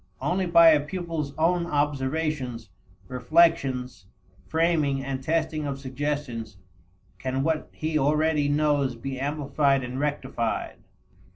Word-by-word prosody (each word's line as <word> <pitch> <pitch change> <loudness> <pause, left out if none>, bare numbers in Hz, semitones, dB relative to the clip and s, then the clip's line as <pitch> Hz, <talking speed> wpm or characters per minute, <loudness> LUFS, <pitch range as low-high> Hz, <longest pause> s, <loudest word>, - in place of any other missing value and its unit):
Only 185 +1 0
by 170 -1 +7
a 155 -2 +5
pupil's 165 -3 -4
own 170 +2 +2
observations, 145 -4 -1 0.4
reflections, 130 - +1 0.4
framing 160 -4 +1
and 135 -1 -3
testing 155 0 -1
of 140 -1 -4
suggestions 130 -5 -4 0.6
can 130 +1 -2
what 160 0 -1
he 155 0 -1
already 150 +1 +2
knows 145 -3 +1
be 130 +3 -5
amplified 140 -1 +1
and 125 +2 -5
rectified. 135 -5 -2
145 Hz, 110 wpm, -26 LUFS, 130-160 Hz, 0.6 s, by